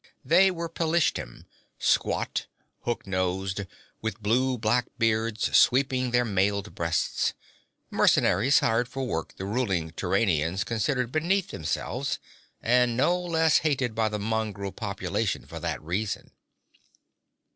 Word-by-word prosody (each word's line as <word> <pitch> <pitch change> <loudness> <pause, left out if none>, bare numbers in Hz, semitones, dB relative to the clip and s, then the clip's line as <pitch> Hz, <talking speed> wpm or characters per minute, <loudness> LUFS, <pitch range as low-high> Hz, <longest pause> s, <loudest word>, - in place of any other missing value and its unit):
They 185 +4 +6
were 170 -2 -3
Pelishtim, 165 - -1 0.3
squat, - - 0 0.4
hook 120 -1 -2
nosed, 95 +1 -1 0.4
with 110 0 -3
blue 125 +5 +1
black 115 +2 +1
beards 115 -1 +1
sweeping 130 -1 +4
their 120 0 +2
mailed 100 0 0
breasts 85 0 0 0.6
mercenaries 120 +11 +4
hired 115 +2 +2
for 135 +1 -4
work 80 -10 -3
the 95 - -5
ruling 95 -7 -1
Turanians 90 -1 0
considered 120 +3 -1
beneath 170 +6 +1
themselves, 80 - -2 0.5
and 120 0 +3
no 170 +7 +3
less 165 -3 +2
hated 135 -6 0
by 110 -1 +1
the 105 - -3
mongrel 105 -2 -2
population 100 -1 -2
for - - -8
that - - -3
reason. 95 +6 -3
115 Hz, 120 wpm, -27 LUFS, 100-130 Hz, 0.6 s, They